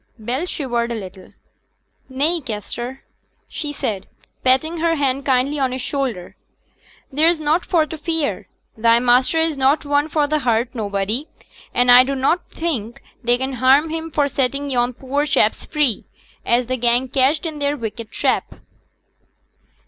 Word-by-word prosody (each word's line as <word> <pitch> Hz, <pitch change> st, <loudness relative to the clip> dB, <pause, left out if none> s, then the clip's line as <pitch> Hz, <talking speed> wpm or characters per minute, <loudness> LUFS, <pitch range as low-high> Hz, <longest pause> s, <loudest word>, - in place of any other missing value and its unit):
Bell 245 Hz, +9 st, -3 dB
shivered 240 Hz, -7 st, -2 dB
a -, -, -2 dB
little. 190 Hz, -3 st, -9 dB, 0.8 s
'Nay, 300 Hz, +6 st, 0 dB
Kester,' 240 Hz, +3 st, -6 dB, 0.4 s
she 295 Hz, -2 st, -5 dB
said, 210 Hz, -9 st, -4 dB, 0.4 s
patting 315 Hz, +6 st, +2 dB
her 330 Hz, 0 st, +2 dB
hand 275 Hz, -1 st, -1 dB
kindly 270 Hz, +3 st, +1 dB
on 265 Hz, -2 st, +1 dB
his 255 Hz, 0 st, -4 dB
shoulder; 255 Hz, -12 st, -3 dB, 0.8 s
'there's 320 Hz, +4 st, +3 dB
nought 310 Hz, +3 st, +1 dB
for 325 Hz, -3 st, +2 dB
t' 320 Hz, -, -7 dB
fear. 320 Hz, -1 st, -2 dB, 0.3 s
Thy 230 Hz, +1 st, +4 dB
master 250 Hz, +5 st, +3 dB
is 320 Hz, -1 st, +1 dB
not 275 Hz, +3 st, +2 dB
one 290 Hz, +1 st, +1 dB
for 300 Hz, -1 st, +1 dB
t' 305 Hz, +1 st, 0 dB
hurt 240 Hz, -2 st, 0 dB
nobody; 215 Hz, +4 st, -2 dB, 0.4 s
and 245 Hz, 0 st, +4 dB
I 250 Hz, +1 st, +9 dB
dunnot 275 Hz, +6 st, 0 dB
think 245 Hz, -9 st, -4 dB, 0.2 s
they 240 Hz, +1 st, +3 dB
can 265 Hz, +1 st, -3 dB
harm 280 Hz, +5 st, +4 dB
him 325 Hz, 0 st, -4 dB
for 290 Hz, -2 st, +1 dB
setting 275 Hz, +1 st, -2 dB
yon 245 Hz, 0 st, +1 dB
poor 280 Hz, +4 st, -2 dB
chaps 220 Hz, -6 st, +2 dB
free, 295 Hz, -9 st, 0 dB, 0.4 s
as 240 Hz, +1 st, +3 dB
t' 255 Hz, +2 st, -2 dB
gang 240 Hz, +2 st, +2 dB
catched 275 Hz, +5 st, +1 dB
i' 320 Hz, -2 st, -3 dB
their 285 Hz, 0 st, 0 dB
wicked 225 Hz, -2 st, -6 dB
trap.' -, -, -1 dB
265 Hz, 155 wpm, -20 LUFS, 240-300 Hz, 0.8 s, I